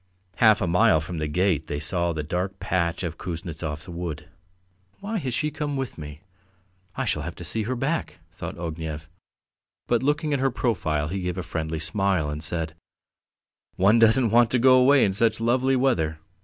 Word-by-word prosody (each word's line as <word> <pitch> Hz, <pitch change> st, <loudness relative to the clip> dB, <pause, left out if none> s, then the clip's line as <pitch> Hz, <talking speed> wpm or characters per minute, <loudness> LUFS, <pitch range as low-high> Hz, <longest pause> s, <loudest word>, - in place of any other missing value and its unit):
Half 110 Hz, -2 st, +5 dB
a 90 Hz, -, 0 dB
mile 90 Hz, 0 st, +4 dB
from 85 Hz, +2 st, -6 dB
the 75 Hz, -, -1 dB
gate 80 Hz, -1 st, 0 dB
they 75 Hz, -, -3 dB
saw 85 Hz, +3 st, +1 dB
the 80 Hz, -2 st, -3 dB
dark 90 Hz, +5 st, -3 dB
patch 85 Hz, -1 st, -1 dB
of 85 Hz, -2 st, -5 dB
Kuznetsov's 80 Hz, -3 st, -5 dB
wood. 85 Hz, -4 st, -6 dB, 0.7 s
"Why 210 Hz, +2 st, -3 dB
has 130 Hz, -6 st, -3 dB
she 150 Hz, +5 st, -1 dB
come 145 Hz, -2 st, -3 dB
with 135 Hz, -9 st, -4 dB
me? 75 Hz, 0 st, -9 dB, 0.7 s
I -, -, -2 dB
shall 75 Hz, -, -1 dB
have 85 Hz, +3 st, -6 dB
to 85 Hz, -, -9 dB
see 110 Hz, +7 st, -1 dB
her 130 Hz, -, 0 dB
back," 140 Hz, +7 st, -2 dB
thought -, -, -7 dB
Ognev, 80 Hz, -2 st, -5 dB, 0.8 s
but 120 Hz, -, +1 dB
looking 150 Hz, +2 st, 0 dB
at 140 Hz, -, +1 dB
her 135 Hz, +1 st, +2 dB
profile 80 Hz, -, -1 dB
he 95 Hz, +2 st, -3 dB
gave 90 Hz, 0 st, -3 dB
a 95 Hz, -, -3 dB
friendly 80 Hz, -2 st, -3 dB
smile 80 Hz, -1 st, 0 dB
and 75 Hz, +1 st, -6 dB
said: 80 Hz, -1 st, -2 dB, 1.0 s
"One 105 Hz, +5 st, +4 dB
doesn't 115 Hz, +1 st, +5 dB
want 120 Hz, 0 st, +5 dB
to 125 Hz, -, +1 dB
go 130 Hz, +1 st, +6 dB
away 135 Hz, +2 st, +5 dB
in 95 Hz, -, 0 dB
such 110 Hz, +3 st, +2 dB
lovely 130 Hz, +3 st, +2 dB
weather. 120 Hz, -13 st, +1 dB
90 Hz, 185 wpm, -25 LUFS, 80-120 Hz, 1.0 s, go